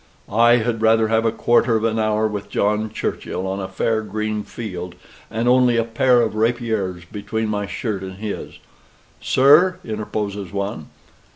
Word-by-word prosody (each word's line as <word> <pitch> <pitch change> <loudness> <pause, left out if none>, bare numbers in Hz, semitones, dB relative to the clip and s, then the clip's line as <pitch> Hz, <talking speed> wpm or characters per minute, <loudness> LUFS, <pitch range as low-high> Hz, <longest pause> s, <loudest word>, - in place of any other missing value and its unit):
"I 120 +2 +6
had 115 -1 -1
rather 110 0 +4
have 115 0 +2
a 115 - +3
quarter 120 +1 +2
of 110 - 0
an 115 0 0
hour 110 0 +1
with 105 -1 -5
John 105 +1 0
Churchill, 95 - -4
on 95 +1 -3
a 95 - -4
fair 110 +4 0
green 110 0 -3
field, 90 -6 -7 0.3
and 115 +2 -2
only 125 -1 +4
a 115 - +3
pair 120 +2 +3
of 110 - -1
rapiers 110 -5 -1
between 105 +4 -4
my 105 -1 -2
shirt 105 -4 -3
and 95 -1 -7
his 105 0 -6 0.4
" - - -33
"Sir!" 155 +8 +5
interposes 105 -3 -4
one. 100 -5 -4
110 Hz, 170 wpm, -21 LUFS, 100-115 Hz, 0.4 s, I